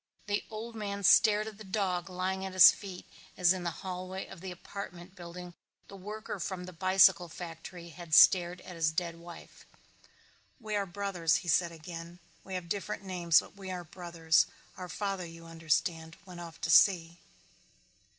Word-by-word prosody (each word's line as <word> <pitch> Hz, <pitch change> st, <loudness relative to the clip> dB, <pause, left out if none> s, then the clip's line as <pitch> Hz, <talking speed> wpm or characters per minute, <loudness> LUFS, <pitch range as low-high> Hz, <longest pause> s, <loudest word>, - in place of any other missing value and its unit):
The 205 Hz, 0 st, -1 dB
old 225 Hz, +2 st, -7 dB
man 200 Hz, -2 st, -5 dB
stared 210 Hz, +2 st, +5 dB
at 215 Hz, -1 st, -9 dB
the -, -, -8 dB
dog 190 Hz, -2 st, -2 dB
lying 185 Hz, +1 st, -2 dB
at 190 Hz, -1 st, -5 dB
his 185 Hz, -, +10 dB
feet 190 Hz, -3 st, -9 dB, 0.3 s
as 180 Hz, 0 st, +5 dB
in 185 Hz, -, -5 dB
the 170 Hz, -, 0 dB, 0.2 s
hallway 185 Hz, +1 st, -5 dB
of 180 Hz, -3 st, -12 dB
the 190 Hz, -, -6 dB
apartment 180 Hz, 0 st, -9 dB
building 175 Hz, 0 st, -9 dB, 0.4 s
the 200 Hz, -, -10 dB
worker 210 Hz, +1 st, -7 dB
from 185 Hz, 0 st, -4 dB
the 185 Hz, 0 st, -9 dB
bicycle 185 Hz, 0 st, +4 dB
factory 170 Hz, +1 st, -9 dB
had 165 Hz, -1 st, -2 dB
stared 180 Hz, -1 st, +6 dB
at 180 Hz, -, -10 dB
his 160 Hz, -1 st, +1 dB
dead 170 Hz, 0 st, -3 dB
wife. 170 Hz, 0 st, -12 dB, 1.0 s
"We 215 Hz, -1 st, -4 dB
are 200 Hz, -1 st, -1 dB
brothers," 180 Hz, -4 st, 0 dB
he -, -, -9 dB
said 170 Hz, +1 st, +2 dB
again. 165 Hz, +1 st, -9 dB, 0.3 s
"We 190 Hz, -, -6 dB
have 180 Hz, -2 st, -5 dB
different 200 Hz, +2 st, -4 dB
names 175 Hz, -4 st, +3 dB
but -, -, -15 dB
we 195 Hz, -1 st, -9 dB
are 180 Hz, -1 st, -4 dB
brothers. 170 Hz, -2 st, +1 dB, 0.3 s
Our 180 Hz, -1 st, -8 dB
father 195 Hz, 0 st, -3 dB
you 165 Hz, 0 st, -12 dB
understand 165 Hz, 0 st, -2 dB
went 180 Hz, -2 st, -10 dB
off 170 Hz, -2 st, -9 dB
to -, -, 0 dB
sea." 170 Hz, -3 st, +5 dB
180 Hz, 175 wpm, -31 LUFS, 170-195 Hz, 1.0 s, his